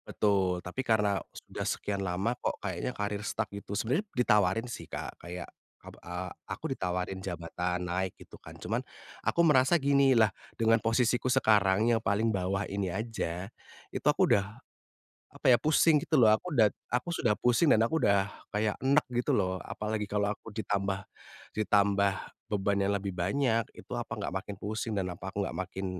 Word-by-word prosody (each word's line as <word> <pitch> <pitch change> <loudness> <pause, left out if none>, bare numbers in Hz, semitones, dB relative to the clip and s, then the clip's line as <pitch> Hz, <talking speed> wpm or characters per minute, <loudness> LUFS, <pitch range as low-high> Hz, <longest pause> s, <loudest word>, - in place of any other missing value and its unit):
Betul, 95 -4 +1
tapi 90 +8 -3
karena 105 -5 +2
sudah - - -9
sekian 100 -1 -2
lama 95 +5 -1
kok 125 - -3
kayaknya 95 0 -3
karier 105 0 -2
stuck 105 0 -2
gitu. 100 0 -5
Sebenarnya 130 - 0
ditawarin 105 -2 +3
sih, 120 - -7
Kak, - - -6
kayak 85 0 -6 0.4
ab - - -12
a 90 +1 -5 0.2
aku - - -4
ditawarin 90 +1 -2
jabatan 90 0 -3
naik 95 +1 -1
gitu - - -13
kan, - - -11
cuman - - -2 0.4
aku 170 - +3
merasa 150 -1 +5
gini, 140 -1 +4
lah 110 -3 +5 0.2
dengan 115 0 +3
posisiku 120 +2 +1
sekarang 105 -2 +4
yang 115 - +4
paling 110 +2 +1
bawah 95 0 -1
ini 100 -3 -2
aja 95 -4 -3 0.4
itu - - -6
aku - - +4
udah, 100 - +4 0.9
apa - - -16
ya, - - +6
pusing 155 +1 +5
gitu 155 - +1
loh. 110 - +7
Aku 170 +10 -2
udah 110 -6 +5 0.2
aku 125 +7 0
sudah 115 -9 +2
pusing 125 +6 +3
dan 110 - +4
aku 160 +6 0
udah 100 -3 +3 0.2
kayak 105 0 +1
eneg 140 +3 +3 0.2
gitu - - -1
loh. 95 -2 0
Apalagi 105 0 -3
kalau 105 0 +1
aku 115 - -12
ditambah 100 -2 -1 0.6
ditambah 100 -2 +3 0.4
beban 100 -1 0
yang 100 +1 +1
lebih 100 -1 -4
banyak, 115 +6 +1
itu - - -14
apa - - -4
enggak - - -4
makin 100 +1 -7
pusing 110 +3 -3
dan 95 -2 -1
apa 90 +2 -7
aku 100 -1 -1
enggak 85 - -5
makin 95 +1 -6
105 Hz, 175 wpm, -30 LUFS, 95-115 Hz, 0.9 s, loh